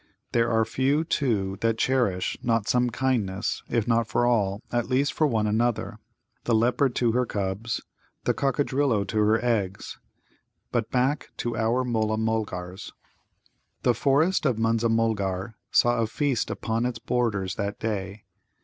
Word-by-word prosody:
There 115 Hz, 0 st, +2 dB
are 110 Hz, -1 st, +2 dB
few, 135 Hz, +6 st, +1 dB
too, 105 Hz, -, -1 dB
that 115 Hz, -1 st, +1 dB
cherish 120 Hz, -10 st, +1 dB
not 115 Hz, -4 st, 0 dB
some 125 Hz, 0 st, +2 dB
kindness, 115 Hz, -5 st, -1 dB
if 115 Hz, -2 st, 0 dB
not 115 Hz, -1 st, +2 dB
for 120 Hz, -, +1 dB
all, 105 Hz, -5 st, +1 dB
at 120 Hz, 0 st, -1 dB
least 135 Hz, +3 st, +1 dB
for 155 Hz, -, +2 dB
one 110 Hz, -5 st, +1 dB
another 110 Hz, 0 st, 0 dB, 0.5 s
the 115 Hz, -, +2 dB
leopard 125 Hz, +3 st, +2 dB
to 120 Hz, -2 st, +2 dB
her 125 Hz, +1 st, +1 dB
cubs, 100 Hz, +3 st, -2 dB, 0.4 s
the -, -, +2 dB
Coccadrillo 135 Hz, -4 st, +1 dB
to 110 Hz, -, -4 dB
her 110 Hz, +3 st, +2 dB
eggs. 100 Hz, -5 st, -1 dB, 0.7 s
But 115 Hz, -2 st, -1 dB
back 130 Hz, +4 st, 0 dB
to 120 Hz, -1 st, -2 dB
our 115 Hz, +3 st, +1 dB
Mulla 110 Hz, -3 st, 0 dB
mulgars. 105 Hz, -5 st, -3 dB, 0.9 s
The 125 Hz, -, +4 dB
forest 145 Hz, -, +2 dB
of 125 Hz, -4 st, +1 dB
Munza 115 Hz, +1 st, +1 dB
mulgar 110 Hz, -3 st, 0 dB, 0.2 s
saw 120 Hz, 0 st, +3 dB
a 115 Hz, -, +1 dB
feast 135 Hz, +1 st, -1 dB
upon 115 Hz, +2 st, -1 dB
its 125 Hz, -2 st, -4 dB
borders 110 Hz, -7 st, -1 dB
that 100 Hz, +1 st, -3 dB
day. 105 Hz, -1 st, -3 dB
115 Hz, 150 wpm, -26 LUFS, 105-125 Hz, 0.9 s, The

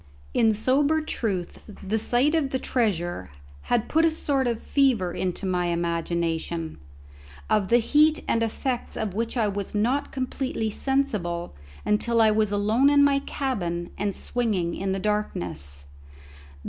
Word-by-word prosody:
In 220 Hz, -1 st, +3 dB
sober 280 Hz, +8 st, +2 dB
truth, 200 Hz, -, -3 dB
the 210 Hz, +1 st, -3 dB
sight 250 Hz, +7 st, +2 dB
of 310 Hz, -4 st, +1 dB
the 265 Hz, -, -1 dB
treasure 175 Hz, -, -1 dB, 0.4 s
had 240 Hz, -2 st, +2 dB
put 320 Hz, +1 st, +2 dB
a 330 Hz, -, +5 dB
sort 280 Hz, -4 st, 0 dB
of 235 Hz, -2 st, -1 dB
fever 240 Hz, -11 st, +1 dB
into 185 Hz, +1 st, -2 dB
my 180 Hz, -2 st, 0 dB
imagination, 170 Hz, -, -2 dB, 0.7 s
of 200 Hz, -3 st, +3 dB
the 235 Hz, -, +5 dB
heat 305 Hz, +6 st, +3 dB
and 230 Hz, -, +1 dB
effects 240 Hz, +2 st, -2 dB
of 215 Hz, -4 st, -2 dB
which 230 Hz, +4 st, -2 dB
I 220 Hz, -3 st, +2 dB
was 200 Hz, 0 st, -4 dB
not 250 Hz, +7 st, 0 dB
completely 255 Hz, -4 st, -2 dB
sensible 210 Hz, -, -1 dB, 0.3 s
until 230 Hz, +3 st, +1 dB
I 220 Hz, -1 st, +6 dB
was 215 Hz, -1 st, +1 dB
alone 215 Hz, +7 st, +3 dB
in 285 Hz, 0 st, +5 dB
my 280 Hz, -1 st, +4 dB
cabin 180 Hz, -, -3 dB
and 200 Hz, 0 st, -2 dB
swinging 205 Hz, -9 st, -1 dB
in 195 Hz, 0 st, -2 dB
the 190 Hz, -, 0 dB
darkness. 90 Hz, -, -2 dB
215 Hz, 145 wpm, -25 LUFS, 180-260 Hz, 0.7 s, I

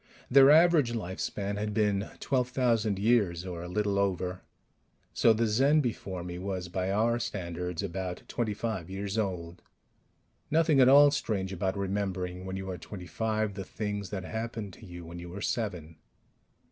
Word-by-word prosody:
Their 135 Hz, +1 st, +8 dB
average 155 Hz, -5 st, +5 dB
lifespan 100 Hz, 0 st, -3 dB
had 105 Hz, 0 st, -3 dB
been 105 Hz, -1 st, +1 dB
12,000 125 Hz, -5 st, +1 dB
years 100 Hz, -5 st, +2 dB
or 90 Hz, -2 st, -5 dB
a 90 Hz, -, -6 dB
little 100 Hz, +1 st, 0 dB
over. 90 Hz, -2 st, -1 dB, 0.7 s
So 115 Hz, -, +5 dB
the 115 Hz, +1 st, +2 dB
Zen 135 Hz, +8 st, +4 dB
before 100 Hz, -8 st, -4 dB
me 90 Hz, 0 st, -6 dB
was, 95 Hz, -2 st, -4 dB
by 95 Hz, +1 st, -2 dB
our 115 Hz, +4 st, +2 dB
standards, 90 Hz, -3 st, -4 dB
about 95 Hz, -1 st, -4 dB
twenty 110 Hz, -4 st, -2 dB
five 105 Hz, -7 st, -3 dB
years 100 Hz, +2 st, -3 dB
old. 90 Hz, -4 st, -3 dB, 0.9 s
Nothing 155 Hz, -2 st, +3 dB
at 130 Hz, -1 st, +7 dB
all 145 Hz, +1 st, +8 dB
strange 100 Hz, -9 st, -2 dB
about 95 Hz, +2 st, -1 dB
remembering, 95 Hz, -2 st, -2 dB
when 95 Hz, 0 st, -4 dB
you 95 Hz, 0 st, -5 dB
are 90 Hz, -, -6 dB
twenty 90 Hz, +1 st, -8 dB
five, 110 Hz, +2 st, -1 dB
the 95 Hz, 0 st, -5 dB
things 105 Hz, 0 st, -4 dB
that 95 Hz, -1 st, -4 dB
happened 110 Hz, -1 st, -5 dB
to 110 Hz, -, -13 dB
you 85 Hz, -1 st, -9 dB
when 85 Hz, +1 st, -8 dB
you 85 Hz, 0 st, -8 dB
were 95 Hz, +3 st, -7 dB
seven 90 Hz, -8 st, -3 dB
100 Hz, 165 wpm, -29 LUFS, 90-115 Hz, 0.9 s, Their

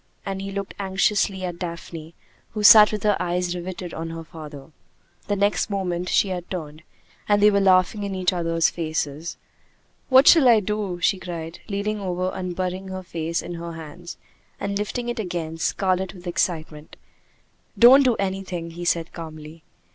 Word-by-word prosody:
and 195 Hz, -1 st, -4 dB
he 195 Hz, -, -5 dB
looked 200 Hz, 0 st, -5 dB
anxiously 195 Hz, 0 st, 0 dB
at 175 Hz, -1 st, -5 dB
Daphne, 170 Hz, -2 st, -7 dB, 0.4 s
who 210 Hz, -1 st, -3 dB
sat 210 Hz, 0 st, +9 dB
with 210 Hz, -2 st, -4 dB
her 210 Hz, -1 st, +3 dB
eyes 175 Hz, 0 st, -1 dB
riveted 180 Hz, 0 st, -6 dB
on 165 Hz, 0 st, -5 dB
her 165 Hz, 0 st, -7 dB
father. 155 Hz, -2 st, -11 dB, 0.6 s
The 205 Hz, -, 0 dB
next 200 Hz, +1 st, +1 dB
moment 180 Hz, -3 st, -2 dB
she 200 Hz, -, +2 dB
had 180 Hz, -1 st, -5 dB
turned, 155 Hz, -4 st, -6 dB, 0.5 s
and 205 Hz, 0 st, +4 dB
they 210 Hz, +1 st, +6 dB
were 200 Hz, -, +3 dB
laughing 190 Hz, +2 st, +3 dB
in 200 Hz, -1 st, -3 dB
each 185 Hz, 0 st, +1 dB
other's 165 Hz, -1 st, +1 dB
faces. 160 Hz, -1 st, -3 dB, 0.7 s
"What 265 Hz, +1 st, +6 dB
shall 315 Hz, -6 st, +8 dB
I 230 Hz, -2 st, +6 dB
do?" 210 Hz, -3 st, -3 dB
she 190 Hz, -, +2 dB
cried, 170 Hz, -2 st, -7 dB
leaning 210 Hz, +1 st, -2 dB
over 185 Hz, -1 st, -2 dB
and 180 Hz, -1 st, -4 dB
burying 185 Hz, +1 st, -3 dB
her 190 Hz, 0 st, -6 dB
face 170 Hz, -1 st, -3 dB
in 175 Hz, -, -6 dB
her 170 Hz, 0 st, -6 dB
hands, 165 Hz, +2 st, -9 dB, 0.4 s
and 200 Hz, 0 st, -3 dB
lifting 210 Hz, +4 st, -3 dB
it 240 Hz, -1 st, -3 dB
again, 170 Hz, -5 st, -4 dB
scarlet 190 Hz, +1 st, 0 dB
with 180 Hz, 0 st, -13 dB
excitement. 160 Hz, -3 st, -3 dB, 0.8 s
"Don't 255 Hz, +4 st, +8 dB
do 255 Hz, -4 st, +3 dB
anything," 190 Hz, -4 st, -4 dB
he 175 Hz, +1 st, -7 dB
said 165 Hz, -1 st, 0 dB
calmly. 155 Hz, -1 st, -9 dB
180 Hz, 170 wpm, -23 LUFS, 165-200 Hz, 0.8 s, sat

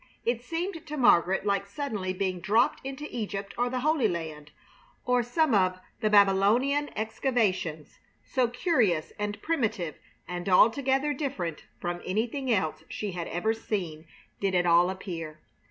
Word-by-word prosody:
It 235 Hz, 0 st, 0 dB
seemed 330 Hz, +5 st, -4 dB
to 300 Hz, -, -5 dB
Margaret 190 Hz, -6 st, +4 dB
like 200 Hz, -1 st, 0 dB
suddenly 205 Hz, -5 st, -3 dB
being 185 Hz, -1 st, -2 dB
dropped 220 Hz, +6 st, +2 dB
into 270 Hz, +2 st, -6 dB
Egypt 200 Hz, -3 st, -4 dB
or 245 Hz, +1 st, 0 dB
the 255 Hz, 0 st, -2 dB
Holy 300 Hz, -4 st, +3 dB
Land, 160 Hz, -5 st, -5 dB, 0.6 s
or 250 Hz, 0 st, +3 dB
some 265 Hz, +4 st, +1 dB
of 185 Hz, -2 st, +2 dB, 0.2 s
the 215 Hz, -2 st, +1 dB
Babylonian 210 Hz, +9 st, +4 dB
excavations, 210 Hz, -, -1 dB, 0.3 s
so 255 Hz, -2 st, +1 dB
curious 235 Hz, -, +1 dB
and 205 Hz, 0 st, -3 dB
primitive 220 Hz, -, -1 dB, 0.3 s
and 180 Hz, +1 st, -4 dB
altogether 270 Hz, +9 st, +4 dB
different 190 Hz, -, -4 dB
from 175 Hz, 0 st, -3 dB
anything 240 Hz, +7 st, -1 dB
else 160 Hz, -7 st, 0 dB
she 210 Hz, -2 st, -4 dB
had 175 Hz, -2 st, -4 dB
ever 220 Hz, +6 st, 0 dB
seen 175 Hz, -8 st, -4 dB, 0.3 s
did 195 Hz, -2 st, 0 dB
it 180 Hz, 0 st, +3 dB
all 175 Hz, +1 st, +5 dB
appear. 165 Hz, -5 st, -6 dB
210 Hz, 145 wpm, -28 LUFS, 180-250 Hz, 0.6 s, all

